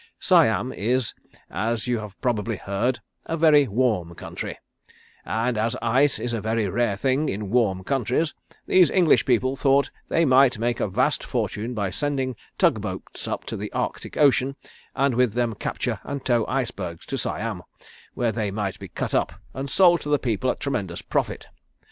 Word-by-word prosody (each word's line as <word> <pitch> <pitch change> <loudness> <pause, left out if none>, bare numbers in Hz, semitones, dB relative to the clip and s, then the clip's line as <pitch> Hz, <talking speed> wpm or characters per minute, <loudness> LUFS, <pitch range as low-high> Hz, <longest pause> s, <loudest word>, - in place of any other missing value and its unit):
Siam - - +3
is, 120 +4 0 0.4
as 115 +2 -1
you 120 -2 0
have 105 -2 -9
probably 115 -3 -1
heard, 115 +7 -1 0.3
a 165 - -2
very 150 -3 +5
warm 105 -7 0
country, - - -6 0.7
and 110 +5 0
as 115 +1 0
ice 135 +5 +3
is 120 -1 -3
a 115 - -2
very 110 0 0
rare 105 +1 0
thing 135 +6 +1
in 100 0 -4
warm 105 -6 +2
countries 135 - 0 0.3
these 185 -2 +5
English 175 -5 +4
people 130 +1 +2
thought 140 0 +2 0.2
they 165 - +2
might 130 -2 +5
make 120 +2 -1
a - - +1
vast 125 +10 +1
fortune 115 0 -3
by 100 -3 -1
sending 135 -2 -1 0.2
tug - - +3
boats - - -6
up - - -3
to - - -5
the - - -5
Arctic - - -3
Ocean, 140 -2 +3 0.4
and 140 -1 +2
with 125 -2 +2
them 120 -1 0
capture - - -3
and 140 -1 -5
tow 120 -3 +2
icebergs 105 -10 -3
to - - -4
Siam, 110 -6 -3 0.5
where 120 -2 +1
they 110 -2 -2
might 100 -1 -3
be - - -8
cut - - -4
up - - +1 0.2
and 135 +1 -4
sold 175 +3 +5
to 150 - -5
the 145 - +4
people 125 -1 -1
at - - -1
tremendous 95 -11 -3
profit. - - -2
120 Hz, 175 wpm, -24 LUFS, 105-135 Hz, 0.7 s, very